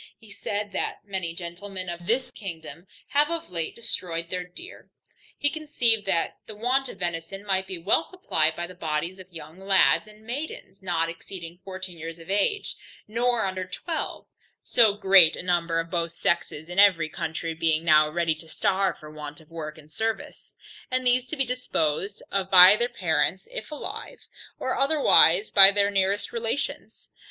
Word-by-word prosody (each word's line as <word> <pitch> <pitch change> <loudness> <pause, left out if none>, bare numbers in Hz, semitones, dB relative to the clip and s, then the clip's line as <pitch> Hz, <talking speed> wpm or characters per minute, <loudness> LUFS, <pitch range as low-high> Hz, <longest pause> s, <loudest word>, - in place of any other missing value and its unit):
He 220 -2 -17
said, 205 +1 -4
that 195 - -4
many 185 -4 -4
gentlemen 185 +2 -7
of 175 0 -7
this 250 +3 0
kingdom, 170 -2 -9 0.2
having 295 +4 +2
of 325 - -7
late 165 -2 -3
destroyed 170 -7 -4
their 180 -1 -2
deer, 180 - -13 0.5
he 290 - +2
conceived 250 -9 +1
that 170 -3 0
the 215 - -8
want 250 +4 0
of - - -10
venison 175 +3 -4
might 190 -1 +1
be 185 - -5
well 175 - +2
supplied 160 - -1
by 175 - -4
the 180 - -11
bodies 165 +2 -3
of 185 0 -13
young 165 +1 -11
lads 195 +2 +3
and 215 +1 -17
maidens, 245 -5 -6
not 170 -3 0
exceeding 170 0 -8
fourteen 185 -2 -8
years 165 +1 -7
of 165 +3 -9
age, 205 - 0 0.3
nor 235 +1 0
under 185 -1 -3
twelve; 315 - -5 0.4
so 220 -4 +4
great 190 -5 +6
a - - -7
number 170 -2 0
of 165 0 -5
both 170 -2 -2
sexes 160 -3 -1
in 180 +2 -2
every 185 -6 +5
county 165 +1 -4
being 160 0 0
now 155 -1 +5
ready 165 0 0
to 155 +1 -13
starve 190 +4 0
for 155 0 -12
want 150 -1 -8
of 160 0 -20
work 155 -2 -7
and 155 0 -17
service: 225 +4 -4 0.3
and 255 0 -1
these 250 +1 +3
to - - -5
be 270 - +2
disposed 200 -8 -2
of 195 -1 -1
by 185 +1 +9
their 240 +3 0
parents - - -1
if - - -6
alive, 305 +10 -7 0.3
or 260 - -2
otherwise 270 - +5
by 195 -1 +10
their 200 0 +2
nearest 195 +1 0
relations. 235 +4 -4
190 Hz, 175 wpm, -25 LUFS, 165-220 Hz, 0.5 s, by